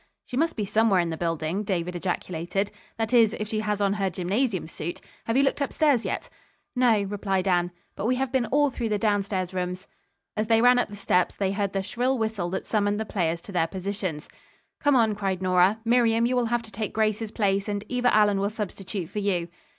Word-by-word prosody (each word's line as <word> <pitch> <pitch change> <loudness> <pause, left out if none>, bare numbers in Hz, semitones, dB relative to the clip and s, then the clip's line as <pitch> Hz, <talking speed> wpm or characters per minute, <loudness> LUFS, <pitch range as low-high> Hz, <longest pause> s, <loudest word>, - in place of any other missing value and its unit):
"She - - -7
must 325 +5 +1
be 210 - -2
somewhere 215 -1 +3
in 170 -1 0
the - - -2
building," 165 +2 -1
David 180 -3 -2
ejaculated. 180 +2 -2 0.3
"That 225 +1 -2
is 230 -3 +5
if 215 - -2
she 215 0 -2
has 210 -1 -1
on 200 -1 +2
her 195 -2 0
gymnasium 190 +3 -1
suit. 170 +1 -5 0.3
Have 230 +2 +1
you 275 - +5
looked 280 - +1
upstairs 280 -3 +2
yet?" - - -3 0.5
"No," 235 -5 +4
replied 195 -1 -1
Anne, 175 -1 +2 0.3
"but 215 - -2
we 255 - +2
have 265 0 -1
been 260 -3 +1
all 290 0 +3
through 235 -2 -3
the 210 - +1
downstairs' 200 -3 0
rooms." 180 0 -3 0.5
As 215 +1 -1
they 225 0 +4
ran 245 +1 +6
up 245 - 0
the 205 - -8
steps 180 -2 +1
they 195 -1 0
heard 200 -1 -1
the 195 -1 -1
shrill 250 +6 0
whistle 220 -6 -1
that 190 +2 -3
summoned 205 -1 +1
the 220 - -2
players 170 -5 -1
to 200 - -10
their 170 -3 +1
positions. 185 -4 -4 0.5
"Come 285 -1 +3
on," 225 -3 +4
cried 195 -3 -2
Nora. 185 +3 +3
"Miriam, 230 -1 +3
you 250 +1 +1
will 245 -1 +2
have 240 0 0
to 220 - -13
take 215 0 -4
Grace's 215 0 0
place, 200 -1 0
and 205 0 -2
Eva 250 -1 +1
Allen 210 -2 +4
will 200 +1 +1
substitute 200 -3 -5
for 210 - -4
you." 180 -4 0
205 Hz, 220 wpm, -26 LUFS, 185-225 Hz, 0.5 s, ran